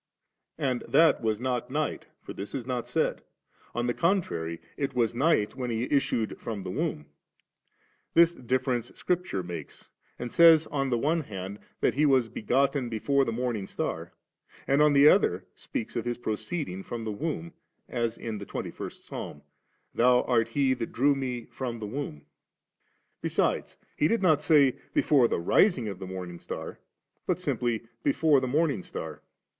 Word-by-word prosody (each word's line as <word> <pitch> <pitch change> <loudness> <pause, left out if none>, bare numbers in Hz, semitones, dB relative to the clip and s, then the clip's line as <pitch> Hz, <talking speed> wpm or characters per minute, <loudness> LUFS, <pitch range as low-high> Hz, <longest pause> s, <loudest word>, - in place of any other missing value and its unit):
And 130 -5 0
that 165 0 +5
was 110 -2 0
not 125 -1 -2
night, 150 +3 -2 0.2
for - - -7
this 100 - -6
is 130 -4 -4
not 125 -2 -3
said; - - 0 0.5
on 120 0 0
the 120 - +1
contrary, 85 - 0 0.2
it 140 -1 -3
was 120 -3 +2
night 125 -4 +2
when 125 -2 -3
He 115 0 -1
issued 125 -6 0
from 105 -4 -5
the 90 - -4
womb. 75 -4 -2 1.1
This 170 0 +6
difference 125 -2 -1
Scripture 180 - -1
makes, 85 -4 -8 0.3
and 120 -1 -5
says 165 -2 +7
on 135 -2 -1
the 120 - +1
one 160 +7 +1
hand 100 -5 -7 0.2
that - - +3
He 150 +3 +3
was 130 -4 +3
begotten 135 +3 +1
before 135 +5 +2
the 115 - -1
morning 115 -4 -2
star, 85 +1 -4 0.5
and 140 +2 +3
on 150 -1 +5
the 140 +1 +7
other 95 - +4
speaks 110 - -5
of 120 0 -2
Ss 120 - -1
procee£ng 110 - -3
from 115 -1 -5
the 110 - -3
womb, 165 +8 -4 0.3
as 115 -2 -2
in 110 -3 -5
the 100 - -7
twenty - - -4
first - - -8
Psahn, 75 - -7 0.2
' - - -44
Thou 125 +1 +4
art 115 -2 +2
he 130 +2 +2
that 120 -3 -4
drew 140 +4 +3
Me 125 -4 -3
from 125 -3 -5
the 110 - -5
womb*.' 105 - -5 1.0
Besides, - - 0 0.2
He 150 - +3
did 230 +1 +1
not 155 -5 +4
say, 145 -4 +4 0.2
'before 135 -5 +4
the - - -1
rising 125 - +3
of 100 -3 -5
the 95 - -6
morning 90 -2 -6
star,' - - -7 0.5
but - - +1
simply 120 -2 -1 0.2
*b^ 140 - +2
fore 155 -4 +4
the 130 - -2
morning 145 - +1
star.' - - -7
125 Hz, 175 wpm, -28 LUFS, 110-145 Hz, 1.1 s, says